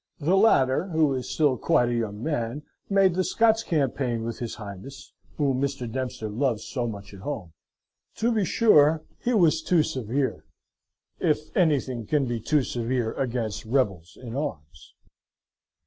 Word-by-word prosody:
The 165 +5 +1
latter, 180 -6 +4
who 160 -5 +2
is 130 -1 -4
still 145 -5 +2
quite 120 - +2
a - - -1
young 110 -2 -3
man, 145 -2 -2 0.3
made 195 -2 +4
the 185 +2 +1
Scots 225 +5 +3
campaign 135 - -1
with 115 0 -5
his 120 -2 -4
Highness, 105 +5 -10 0.2
whom 135 -3 +1
Mr. 135 -3 -2
Dempster 125 -2 -4
loves 115 0 -1
so 120 0 -3
much 100 -2 -8
at 100 - -11
home. 95 - -6 0.6
To 235 +2 +1
be 220 -3 +1
sure, 160 -7 +4 0.2
he 245 0 0
was 165 -5 +4
too 165 -1 +3
severe: 130 - -2 0.8
if 150 0 -1
anything 135 - +1
can 145 +1 +1
be 120 -2 -2
top 145 +5 +1
severe 120 -1 -2
against 120 -5 -2
rebels 100 -8 -1
in 120 -2 -7
arms. 80 - -6
130 Hz, 155 wpm, -26 LUFS, 115-155 Hz, 0.8 s, latter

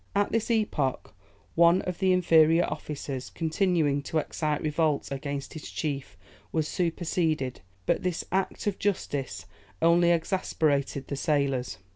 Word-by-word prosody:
At 205 0 +2
this 225 0 0
epoch, 210 - 0 0.4
one 170 +2 +5
of 180 -2 -4
the 190 -1 +3
inferior 165 -2 +5
officers, 145 -3 -5
continuing 160 -3 +1
to 160 - -3
excite 150 -1 -1
revolt 155 -2 0
against 140 0 -4
his 155 - -8
chief, 140 -3 -4 0.3
was 155 -2 0
superseded; 165 -6 -1 0.2
but - - +1
this 180 -2 -2
act 190 +1 -1
of 205 -2 -1
justice 145 -9 -2 0.3
only 170 +1 +4
exasperated 155 -5 0
the 140 - -3
sailors. 140 -4 0
160 Hz, 130 wpm, -27 LUFS, 140-175 Hz, 0.4 s, one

